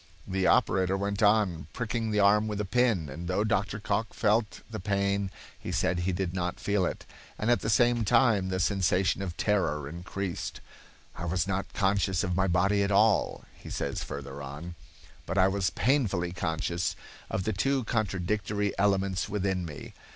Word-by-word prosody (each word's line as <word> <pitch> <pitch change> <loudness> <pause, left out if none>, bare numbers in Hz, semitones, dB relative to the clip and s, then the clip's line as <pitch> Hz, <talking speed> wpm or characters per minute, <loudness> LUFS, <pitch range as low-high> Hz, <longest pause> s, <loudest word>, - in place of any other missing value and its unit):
The 95 0 0
operator 95 0 +3
went 100 +1 -2
on, 105 -7 +3
pricking 115 -1 -2
the 105 -1 +1
arm 105 +2 +4
with 105 -1 -3
a 105 - -1
pin, 110 -5 +2
and 85 +6 -7
though 95 +3 +1
Dr. 110 -1 0
Cocke 105 +1 -2
felt 110 0 +1
the 110 -2 -6
pain 100 0 0 0.3
he - - -5
said 90 - +1
he 90 +2 0
did 90 -1 -2
not 90 -1 -2
feel 100 -3 +1
it, - - -6 0.3
and 110 +3 +1
at 120 - +4
the - - -3
same 120 +1 +3
time 105 -3 +3
the 95 0 -1
sensation 95 0 +1
of 90 -4 -5
terror 80 -9 0
increased. 90 +3 -5 0.6
"I 85 - -4
was 90 +2 0
not 100 0 -2
conscious 95 -2 +1
of 90 -3 -1
my 95 +1 +2
body 95 +3 +2
at 100 - +1
all," 105 +2 +3
he - - -12
says - - -3
further 70 0 -7
on, 75 +5 -7 0.5
"but 95 - -2
I 95 0 +6
was 95 -1 +1
painfully 100 -7 +1
conscious 85 0 -2 0.3
of 95 - -1
the 110 - -1
two 135 -1 +1
contradictory 105 -1 -1
elements 100 -1 +1
within 95 -3 -1
me. 75 -3 -8
95 Hz, 175 wpm, -29 LUFS, 90-105 Hz, 0.6 s, I